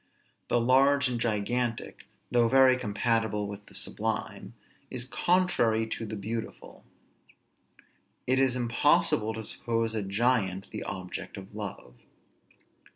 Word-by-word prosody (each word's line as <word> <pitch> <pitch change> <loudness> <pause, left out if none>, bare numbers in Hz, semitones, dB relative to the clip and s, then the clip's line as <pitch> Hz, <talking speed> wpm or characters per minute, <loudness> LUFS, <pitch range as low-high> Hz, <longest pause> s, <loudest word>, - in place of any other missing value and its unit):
The 120 - +2
large 135 +3 +4
and 120 -2 -3
gigantic, 115 +2 -2 0.2
though 120 -1 +4
very 130 0 +6
compatible 110 -2 0
with 100 0 -9
the - - -13
sublime, - - -3 0.3
is 125 -1 -4
contrary 130 -9 +2
to 110 0 -5
the 110 - -5
beautiful. 110 +3 -6 1.4
It 130 +1 +2
is 130 -2 +3
impossible 115 -2 +2
to 110 - -5
suppose 115 +1 -1
a 110 - -1
giant 100 -2 0
the - - -5
object 90 +2 -6
of 95 +1 -10
love. 100 - -6
115 Hz, 120 wpm, -28 LUFS, 105-125 Hz, 1.4 s, very